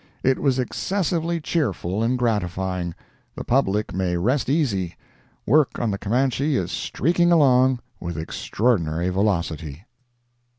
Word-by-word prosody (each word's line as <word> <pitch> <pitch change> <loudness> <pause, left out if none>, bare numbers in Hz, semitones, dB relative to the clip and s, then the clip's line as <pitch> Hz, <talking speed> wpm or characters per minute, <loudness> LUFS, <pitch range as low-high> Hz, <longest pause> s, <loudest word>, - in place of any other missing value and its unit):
It 130 0 +2
was 135 -3 +1
excessively 170 +4 -1
cheerful 110 - -1
and 120 +3 +1
gratifying. 95 -6 -1 0.4
The - - -5
public 105 -5 +1
may 90 -1 0
rest 125 +10 0
easy—work 125 - -1
on 115 -3 0
the 100 - -3
Camanche 130 +6 +1
is - - -2
streaking 175 +3 +1
along 130 -5 +4 0.2
with 85 -1 -5
extraordinary 85 0 0
velocity. 85 -4 -1
115 Hz, 115 wpm, -23 LUFS, 90-135 Hz, 0.4 s, along